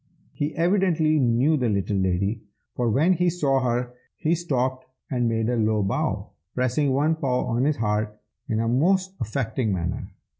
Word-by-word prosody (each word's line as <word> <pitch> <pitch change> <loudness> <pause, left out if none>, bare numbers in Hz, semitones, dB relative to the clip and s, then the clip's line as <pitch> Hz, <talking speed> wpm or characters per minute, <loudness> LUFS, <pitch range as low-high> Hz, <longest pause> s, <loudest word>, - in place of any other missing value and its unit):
He 145 +1 -3
evidently 170 -3 +2
knew 130 +5 +3
the 125 -4 0
little 100 0 0
lady, 95 +4 0 0.3
for 120 -1 0
when 155 +11 +3
he 180 0 +2
saw 145 -6 +1
her 125 0 -1 0.2
he 160 0 +1
stopped 130 -6 -1 0.2
and 120 -3 +1
made 115 -1 0
a 125 - +1
low 110 -2 +1
bow, 95 - -2 0.2
pressing 130 +3 +1
one 145 +4 +2
paw 130 -5 -1
on 125 +1 0
his 150 0 +1
heart 105 -1 -1 0.3
in 110 - 0
a 115 - 0
most 185 +10 +2
affecting 110 -1 -1
manner. 90 -1 -3
125 Hz, 165 wpm, -24 LUFS, 110-155 Hz, 0.3 s, knew